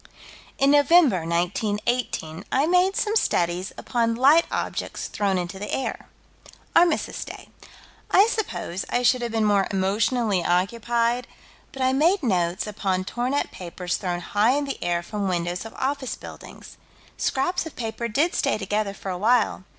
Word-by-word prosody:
In 275 +1 +4
November, 290 - +4
1918, 190 0 -1
I 275 +3 +3
made 365 +3 +3
some 430 0 0
studies 175 - 0
upon 230 -2 0
light 285 +7 +5
objects - - -3
thrown 200 -2 0
into 180 +1 -4
the 210 - -5
air. 265 - -3 0.7
Armistice 345 0 +2
day. - - -10 0.6
I 390 - +6
suppose 400 - -3
I 245 - 0
should 245 +1 +3
have 235 -1 -3
been 225 -1 +1
more 200 -2 +3
emotionally 200 +1 +1
occupied, 235 +7 0 0.4
but 270 - -4
I 260 0 +3
made 335 +6 +3
notes 180 -6 0
upon 195 -3 -2
torn 245 +7 -2
up 285 - -1
papers 180 0 -4
thrown 175 -2 -3
high 210 +7 +2
in 290 +1 0
the 275 - -5
air 175 0 0
from 205 +2 -3
windows 175 +1 -2
of 225 - -10
office 270 -1 -2
buildings. - - -12 0.4
Scraps 330 +6 -1
of 320 - -11
paper 235 0 -4
did 295 +10 +1
stay 275 - +1
together 205 0 -2
for 195 - -5
a 180 - -4
while. 220 -3 +2
225 Hz, 160 wpm, -24 LUFS, 185-270 Hz, 0.7 s, I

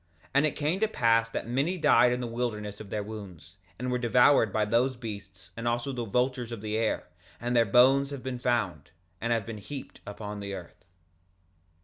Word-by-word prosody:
2:38 - - -26
And 140 +2 +4
it - - -4
came 155 +5 0
to 220 - +3
pass 115 - +2
that 115 - -4
many 140 +10 0
died 120 -7 +5
in 125 0 -1
the - - -2
wilderness 115 -4 -3
of 105 - -9
their 105 0 -2
wounds, 95 -5 -10 0.2
and 125 +1 -3
were 125 - 0
devoured 120 -1 +4
by 110 +1 +1
those 120 +5 +2
beasts 100 -7 -9
and 115 +1 -4
also 120 +3 0
the 120 -3 -3
vultures 125 +2 0
of 115 -3 -6
the 110 0 -3
air; 110 0 0 0.3
and 120 +1 -2
their 115 -1 +5
bones 130 +6 +5
have 140 -3 -7
been 130 -2 -4
found, 110 - -1 0.3
and 115 - -1
have 115 -3 +1
been 115 -2 -6
heaped 135 +6 -9
up 105 0 -8
on 105 -1 -5
the 100 -1 -5
earth. 90 -3 -11
115 Hz, 215 wpm, -28 LUFS, 105-125 Hz, 0.3 s, died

